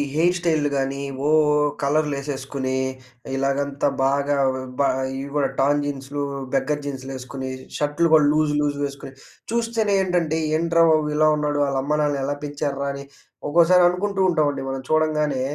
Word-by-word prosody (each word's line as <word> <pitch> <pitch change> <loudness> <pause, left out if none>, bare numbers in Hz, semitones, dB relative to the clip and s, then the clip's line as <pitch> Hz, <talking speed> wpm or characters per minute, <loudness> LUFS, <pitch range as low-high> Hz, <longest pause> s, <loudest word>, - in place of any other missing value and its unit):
Hair 175 +3 +3
స్టైలులు 155 -4 +1
గాని, 135 +1 -2 0.3
ఓ - - +2 0.5
కలర్లు 150 0 +1
ఏసేసుకొని, 135 -1 -4 0.6
ఇలాగంతా 140 +1 0 0.2
బాగా 140 +1 +1 0.2
వ - - -4 0.2
బా 140 - +4 0.3
ఇవి 140 +1 -6
కూడా 135 -2 +1
టర్న్ 145 +2 +2
జీన్స్‌లు 145 0 -4 0.3
బెగ్గర్ 145 +2 0
జీన్స్‌లు 135 -1 -5
ఏసుకొని, 130 +1 -6 0.3
షర్టులు 150 +3 +1
కూడా 155 -2 +6
లూజ్, 155 -1 +2
లూజ్ 145 -1 -1
వేసుకొని, 140 -1 -6 0.4
చూస్తేనే 230 -3 0
ఏంటంటే 170 -4 0 0.2
ఏంట్రా 165 0 +3
బాబు, 155 -1 +2
ఇలా 155 0 +4
ఉన్నాడు? 145 -1 0
ఆళ్ళ 135 -1 -1
అమ్మానాన్న 150 -1 0
ఎలా 145 +1 -1
పెంచార్రా, 145 -1 -3
అని 140 0 -8 0.4
ఒక్కోసారి 175 +3 +5
అనుకుంటూ 195 +2 -2
ఉంటామండి 150 -4 0
మనం 135 0 -4
చూడంగానే. 150 -3 +1
145 Hz, 145 wpm, -22 LUFS, 140-155 Hz, 0.6 s, కూడా